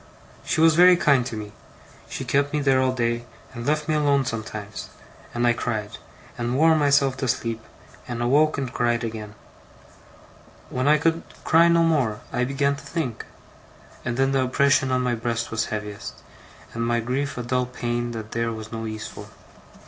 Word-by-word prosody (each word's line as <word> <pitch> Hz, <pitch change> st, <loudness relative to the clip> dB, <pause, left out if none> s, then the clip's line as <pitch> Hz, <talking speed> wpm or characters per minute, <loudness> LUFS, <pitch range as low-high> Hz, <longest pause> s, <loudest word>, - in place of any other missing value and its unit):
She -, -, -1 dB
was 165 Hz, 0 st, +6 dB
very 180 Hz, +2 st, +7 dB
kind 140 Hz, -7 st, +4 dB
to 110 Hz, -, -5 dB
me. 105 Hz, -1 st, -7 dB, 0.6 s
She -, -, -5 dB
kept 140 Hz, +1 st, +1 dB
me 150 Hz, -, +1 dB
there 135 Hz, -2 st, +3 dB
all 130 Hz, 0 st, +2 dB
day, 120 Hz, -1 st, -1 dB, 0.3 s
and 120 Hz, -1 st, -6 dB
left 150 Hz, 0 st, 0 dB
me 155 Hz, -, +1 dB
alone 145 Hz, -3 st, +2 dB
sometimes; 110 Hz, -3 st, -5 dB, 0.4 s
and 120 Hz, 0 st, 0 dB
I 120 Hz, -, +4 dB
cried, 110 Hz, -3 st, -3 dB, 0.4 s
and 120 Hz, +2 st, -1 dB
wore 160 Hz, +2 st, +5 dB
myself 140 Hz, -3 st, +3 dB
to 130 Hz, -, -2 dB
sleep, 115 Hz, -1 st, -1 dB, 0.5 s
and 120 Hz, -1 st, -4 dB
awoke 145 Hz, +6 st, +3 dB
and 130 Hz, -4 st, -3 dB
cried 120 Hz, -1 st, +1 dB
again. 110 Hz, -2 st, -6 dB, 1.4 s
When 130 Hz, +2 st, -1 dB
I 150 Hz, +1 st, +6 dB
could 165 Hz, +2 st, +1 dB, 0.2 s
cry 165 Hz, +1 st, +5 dB
no 170 Hz, 0 st, +4 dB
more, 135 Hz, -10 st, +1 dB
I 125 Hz, -, +1 dB
began 140 Hz, +1 st, +1 dB
to 140 Hz, -, -12 dB
think; 140 Hz, -5 st, -4 dB, 0.8 s
and 120 Hz, -1 st, -2 dB
then 135 Hz, 0 st, +2 dB
the 135 Hz, -1 st, +2 dB
oppression 135 Hz, +1 st, +2 dB
on 130 Hz, 0 st, +2 dB
my 125 Hz, -1 st, +1 dB
breast 115 Hz, 0 st, -2 dB
was 115 Hz, 0 st, 0 dB
heaviest, 105 Hz, -1 st, -6 dB, 0.5 s
and 115 Hz, -, -2 dB
my 120 Hz, 0 st, +1 dB
grief 130 Hz, +5 st, -2 dB
a 125 Hz, -, -3 dB
dull 125 Hz, +1 st, 0 dB
pain 120 Hz, -1 st, -2 dB
that 110 Hz, -2 st, -7 dB
there 115 Hz, 0 st, -1 dB
was 110 Hz, -1 st, -7 dB
no 115 Hz, 0 st, -4 dB
ease 110 Hz, 0 st, -5 dB
for. 105 Hz, -, -10 dB
125 Hz, 185 wpm, -24 LUFS, 115-140 Hz, 1.4 s, very